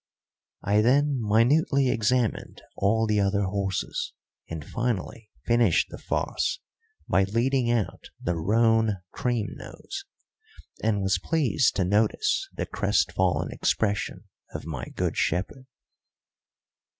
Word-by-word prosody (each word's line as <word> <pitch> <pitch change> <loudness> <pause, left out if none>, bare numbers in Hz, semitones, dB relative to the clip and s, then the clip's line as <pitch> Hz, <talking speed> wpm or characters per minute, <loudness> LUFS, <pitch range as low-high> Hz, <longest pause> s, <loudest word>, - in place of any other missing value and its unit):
I 105 +2 +3
then 140 +4 +3
minutely 125 +5 +3
examined 115 0 0
all 110 +3 +2
the 105 -1 +1
other 100 0 +1
horses, 95 0 -2 0.4
and 80 -3 -6
finally 115 -2 -3 0.2
finished 115 -6 +3
the - - -8
farce - - -1 0.5
by 95 - +3
leading 120 +4 +1
out 120 -4 -1
the 85 - -1
roan 110 +4 +2
cream 120 -6 -1
nose, - - -8 0.8
and 105 -3 +1
was 95 - +2
pleased 150 -5 +1
to 95 - +1
notice 105 +3 +1
the - - -4
crestfallen 95 -1 0
expression 105 -2 -1 0.3
of - - -5
my 75 -7 -5
good - - -3
shepherd. 100 - -1
110 Hz, 115 wpm, -26 LUFS, 100-120 Hz, 0.8 s, I